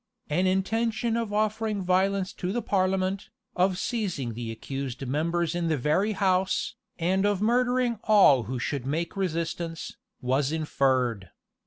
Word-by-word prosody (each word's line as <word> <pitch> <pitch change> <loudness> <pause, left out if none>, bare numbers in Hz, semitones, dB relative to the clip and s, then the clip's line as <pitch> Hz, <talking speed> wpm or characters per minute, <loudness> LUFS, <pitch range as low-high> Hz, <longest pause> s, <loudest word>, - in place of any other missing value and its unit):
An 180 +5 +2
intention 225 +5 0
of 230 -3 -2
offering 215 -1 0
violence 190 +1 +1
to 180 - -3
the 240 +3 -2
parliament, 190 0 0 0.3
of 185 0 +2
seizing 180 - -2
the 115 0 -5
accused 135 +3 -5
members 165 +5 0
in 175 -1 -1
the 160 -2 +1
very 155 - +1
house, 190 -1 +1 0.2
and 185 +3 +1
of 205 -2 +2
murdering 245 +1 +2
all 170 - +6
who 130 +4 -3
should 130 +1 -3
make 165 +4 -2
resistance, 170 -2 -3 0.2
was 130 +3 0
inferred. 130 - 0
185 Hz, 140 wpm, -27 LUFS, 145-205 Hz, 0.3 s, all